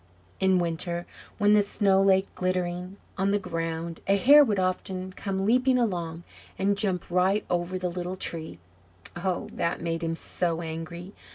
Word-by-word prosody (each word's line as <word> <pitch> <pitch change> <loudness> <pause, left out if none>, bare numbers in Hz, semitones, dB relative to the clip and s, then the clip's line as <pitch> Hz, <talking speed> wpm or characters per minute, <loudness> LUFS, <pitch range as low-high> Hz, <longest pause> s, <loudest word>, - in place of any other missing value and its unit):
In 190 -1 +4
winter, 170 0 -2 0.3
when 205 -1 +4
the 210 - +6
snow 200 -1 +2
lay 190 0 +4
glittering 180 +1 -2 0.2
on 195 +1 +2
the 205 - +3
ground, 165 -3 -4
a 195 +1 +4
hare 290 +8 +8
would 215 -7 0
often 185 0 -2
come 195 0 -3
leaping 255 +3 +3
along, 175 -8 -2 0.3
and 200 +1 +2
jump 190 -4 -2
right 185 +4 +2
over 175 +1 0
the 180 0 -2
little 180 +1 -4
Tree. 160 - -5 0.6
Oh, 175 0 -2
that 170 - -1
made 165 0 -2
him 165 0 -1
so 170 0 -1
angry! 165 +3 -6
185 Hz, 160 wpm, -27 LUFS, 170-195 Hz, 0.6 s, hare